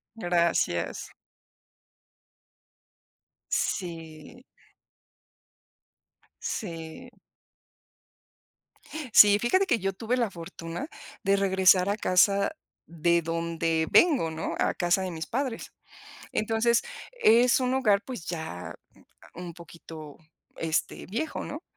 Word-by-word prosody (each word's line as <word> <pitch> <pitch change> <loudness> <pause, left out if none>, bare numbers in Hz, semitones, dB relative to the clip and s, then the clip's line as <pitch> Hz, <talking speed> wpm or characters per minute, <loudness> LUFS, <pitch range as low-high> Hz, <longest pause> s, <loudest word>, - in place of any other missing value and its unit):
Gracias. 170 - 0 2.4
Sí 165 - -4 2.0
Sí. 165 +5 -6 2.0
Sí, 205 0 +8
fíjate 375 - +2
que 310 - +1
yo 195 0 -2
tuve 230 +5 -2
la 235 -3 +1
fortuna 165 - -7 0.4
de 195 - +3
regresar 190 -1 +4
a 205 - 0
casa 200 0 +3 0.3
de 170 +1 +1
donde 165 0 -1
vengo, 275 - +4
¿no?, 160 - -4
a - - +1
casa 175 +2 +1
de 185 - -3
mis 160 -2 -6
padres. 255 -1 -3 0.6
Entonces, 225 +2 +1 0.3
es 245 - +4
un 255 0 0
hogar, 210 -6 +3
pues, 245 -11 -7
ya 160 - -6 0.6
un 175 -1 -8
poquito, 165 -3 -11 0.4
este, 160 0 -2
viejo, 235 - -4
¿no?, 300 +5 -7
185 Hz, 95 wpm, -27 LUFS, 165-230 Hz, 2.4 s, Sí